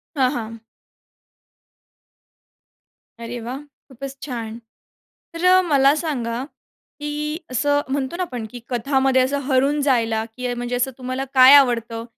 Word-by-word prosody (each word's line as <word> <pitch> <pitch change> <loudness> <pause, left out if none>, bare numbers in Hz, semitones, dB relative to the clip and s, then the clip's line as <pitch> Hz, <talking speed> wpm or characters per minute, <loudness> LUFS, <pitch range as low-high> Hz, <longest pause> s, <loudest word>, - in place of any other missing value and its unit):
हां, 260 -2 +3
हां. 230 -1 -5 2.6
अरे 235 +1 -6
वाह! 245 +4 -5 0.3
खूपच 270 +1 -8
छान. 230 -5 -5 0.8
तर 365 +2 +4
मला 280 -2 +4
सांगा, 250 -7 -3 0.6
की 300 +1 -3
असं 285 +3 +1
म्हणतो 275 +3 -2
ना 365 - -2
आपण, 250 -10 -5
की 245 - -9
कथामध्ये 265 +1 +2
असं 275 +3 0
हरवून 275 +3 +2
जायला, 230 -5 +1
की 250 -1 -3
म्हणजे 245 +1 -3
असं 250 +2 0
तुम्हाला 255 +1 -3
काय 260 +2 +9
आवडतं? 230 -4 +3
260 Hz, 125 wpm, -21 LUFS, 240-285 Hz, 2.6 s, काय